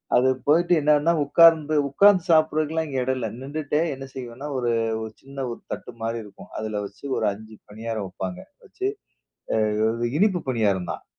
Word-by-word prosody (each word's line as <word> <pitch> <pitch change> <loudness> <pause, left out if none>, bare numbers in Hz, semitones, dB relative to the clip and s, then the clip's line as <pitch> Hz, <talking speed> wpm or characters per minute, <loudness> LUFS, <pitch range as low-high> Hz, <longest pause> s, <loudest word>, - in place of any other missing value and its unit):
அது 130 +2 +4 0.2
போயிட்டு 175 +4 +4
என்னன்னா, 150 +2 +3
உட்கார்ந்து 155 0 +5
உட்காந்து 190 +4 +5
சாப்பிட்றதுக்கலாம் 155 0 +2
இங்க 135 -2 -4
எடம் 130 +1 0
இல்ல. 115 - -2
நிண்டுட்டே 150 +2 -2
என்ன 135 0 -8
செய்வேன்னா, 130 +2 -7
ஒரு 120 -2 0 0.3
ஒரு 110 - -6
சின்ன 135 -1 -6
ஒரு - - -7
தட்டு 125 - -8
மாரி 115 0 -2
இருக்கும். 100 -2 -14
அதில 110 -1 -3
வச்சி 100 +7 -12
ஒரு - - +1
5 110 +1 -12
பணியாரம் 110 -1 -4
வப்பாங்க. 90 -1 -5 0.3
வச்சி - - -6 0.8
அ - - -1 0.2
அது 120 +2 -2
இனிப்பு 190 -5 +3
பணியாரம் 100 -7 0
தான். - - -10
130 Hz, 165 wpm, -24 LUFS, 110-155 Hz, 0.8 s, உட்கார்ந்து